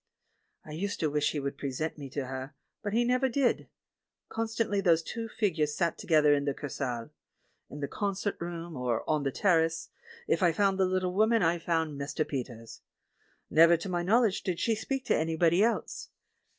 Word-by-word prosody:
I 155 - -10
used 200 +7 -3
to 155 -2 +1
wish 150 0 +1
he 150 - -2
would 140 0 -4
present 145 +3 -3
me 140 -2 -7
to 140 +1 -3
her, 130 +2 -6 0.3
but 205 -1 -3
he 235 +2 +3
never 250 +2 +2
did. 255 0 +1 0.6
Constantly 225 -2 -1
those 165 -3 +3
two 230 +4 -5
figures 160 -10 0
sat 170 -2 0
together 150 -3 +4
in 140 -1 +1
the 140 -2 -1
Kursaal. 130 -2 -4 0.6
In 145 - -8
the 140 - -1
concert 200 +2 -2
room, 170 -1 -5
or 125 -3 -2
on 155 -1 +1
the 135 -1 -1
terrace, 165 -2 +1 0.4
if - - +1
I 175 -3 +4
found 195 +2 +2
the 190 - +4
httle 185 -1 0
woman 220 +2 +3
I 170 +1 +2
found 160 -4 -1
Mr. 145 +2 -2
Peters. 120 -4 -6 0.7
Never 165 +2 +7
to 180 +4 -6
my 175 -1 0
knowledge 215 +2 +3
did 180 -2 -2
she 230 - +2
speak 255 +4 -3
to - - +2
anybody 165 +3 +2
else. 230 +1 -1
165 Hz, 185 wpm, -29 LUFS, 145-200 Hz, 0.7 s, Never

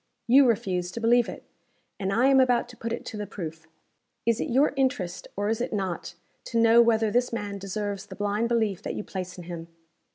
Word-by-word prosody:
You 265 +2 +6
refuse 185 -6 0
to - - -4
believe 235 +1 +3
it - - -8 0.6
and 195 -1 -1
I 235 +6 +3
am 270 0 +6
about 245 -2 +3
to 245 - -12
put 230 0 -5
it - - -4
to 215 - -6
the 210 -1 -4
proof. 160 -4 -7 0.6
Is 230 0 +2
it - - -2
your 270 +5 +3
interest 255 -10 -1
or 205 +1 -1
is 225 +2 0
it - - -2
not, 185 -4 -3 0.3
to 230 - -1
know 230 +1 +7
whether 225 -2 +3
this 245 +2 +1
man 205 -3 -4
deserves 200 0 -4
the - - -9
blind 205 +3 -1
belief 220 -5 +1
that - - -4
you - - -4
place 185 -2 -6
in 180 - -8
him?" 170 -1 -7
215 Hz, 220 wpm, -26 LUFS, 195-235 Hz, 0.6 s, know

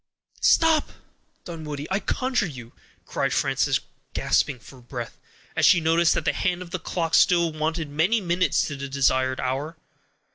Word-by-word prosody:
"Stop! 325 -2 +3 0.5
Dunwoodie, 150 -4 -6
I 195 - +1
conjure 255 -2 -1
you," 125 -6 -10 0.3
cried - - -1
Frances, - - +1 0.4
gasping 140 -3 +1
for 125 +2 -15
breath, 120 -1 -7 0.4
as - - 0
she 180 - +6
noticed 165 +1 +3
that 155 - -2
the 150 - +2
hand 180 +4 -1
of 170 - -14
the 185 - -3
clock 165 -1 -3
still 170 -2 +4
wanted 155 +1 -2
many 160 +11 +1
minutes 180 -1 +1
to 145 - -5
the 140 0 -6
desired 130 -1 +1
hour. 140 +6 -3
160 Hz, 155 wpm, -24 LUFS, 140-175 Hz, 0.5 s, she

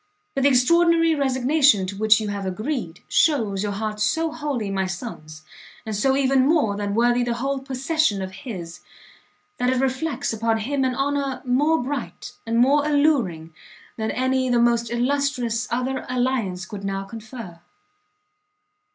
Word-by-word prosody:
But 275 - -1
the 280 - +5
extraordinary 330 +5 +4
resignation 270 -5 +3
to 190 +1 -5
which 215 +1 +4
you 215 -1 -3
have 200 -1 -4
agreed, 215 - -4
shews 225 -11 +2
your 205 -1 -2
heart 215 +1 -4
so 320 +9 +1
wholly 280 -10 -3
my 190 -1 -1
son's, 155 -6 -8 0.4
and 220 -1 -3
so 265 +6 +2
even 270 -1 +3
more 290 -11 +2
than 205 0 -3
worthy 240 +1 +3
the 240 -1 -1
whole 275 +3 -2
possession 270 -3 0
of 190 0 -5
his, 185 -5 -8 0.8
that 250 0 +1
it 260 - +1
reflects 265 0 -1
upon 225 0 0
him 270 +5 -1
an 255 -1 0
honour 275 -1 -1
more 285 +4 +2
bright 270 -1 -5 0.2
and 230 0 0
more 275 +5 +4
alluring, 270 - +1 0.4
than 220 -1 -3
any 260 0 0
the 245 - +3
most 235 -1 +2
illustrious 245 -1 0
other 255 +2 -2
alliance 245 -8 -1
could 200 -2 -8
now 195 0 -2
confer. 220 -4 -9
245 Hz, 155 wpm, -23 LUFS, 210-275 Hz, 0.8 s, the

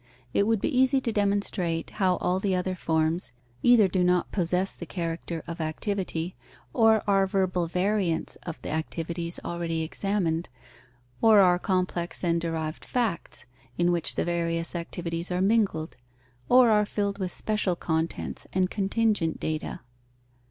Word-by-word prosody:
It 200 - +2
would 225 -2 +2
be 270 - -1
easy 260 +1 +4
to 240 -3 -2
demonstrate 200 -5 0
how 185 -3 +2
all 180 +1 0
the 195 -1 0
other 185 +1 -1
forms, 160 -3 0 0.3
either 240 -5 +6
do 185 0 +1
not 180 0 +2
possess 180 +1 0
the - - -9
character 165 -2 -4
of 170 0 -6
activity, 175 +1 -2 0.4
or 225 -2 +4
are 195 -1 +3
verbal 185 -3 0
variants 180 -1 0
of 170 - -8
the - - -4
activities 170 +2 -2
already 165 -1 -2
examined, 170 -1 -1 0.7
or 220 -2 +7
are 180 -2 +5
complex 180 -2 -1
and 170 -1 +1
derived 160 -1 -3
facts, 230 -9 -2 0.3
in 175 0 +3
which 170 -2 0
the - - 0
various 170 -1 -1
activities 170 0 -4
are 180 - 0
mingled, 195 -6 +1 0.5
or 250 -2 +7
are 210 -1 +4
filled 200 -1 -2
with 185 -2 -2
special 210 -3 0
contents 160 -1 -3
and 185 -1 +1
contingent 205 -4 0
data. 155 0 -3
180 Hz, 145 wpm, -27 LUFS, 165-200 Hz, 0.7 s, or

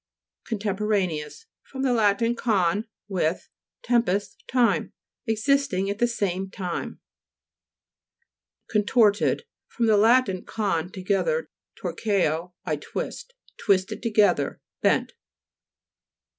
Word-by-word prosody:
CONTEMPORANEOUS 200 - -1 0.2
fr. 270 - -13
lat. 230 -5 +2
con, 205 -3 +1 0.2
with, 180 -4 -1 0.3
tempus, 230 -5 +1
time. 245 -2 +2 0.3
Existing 220 -4 +1
at 200 - -5
the 240 - +4
same 195 -5 -2
time. 185 -3 -5 1.7
CONTO'RTED 210 - +3 0.2
fr. 240 - -3
lat. 225 +3 +5 0.2
con, 185 -5 -1
together, 210 - -1 0.3
torqueo, 180 -4 -1
I 155 -4 -1
twist. 485 - -6 0.2
Twisted 190 -2 +1
together; 215 -3 +2 0.2
bent. - - +2
210 Hz, 85 wpm, -25 LUFS, 190-235 Hz, 1.7 s, lat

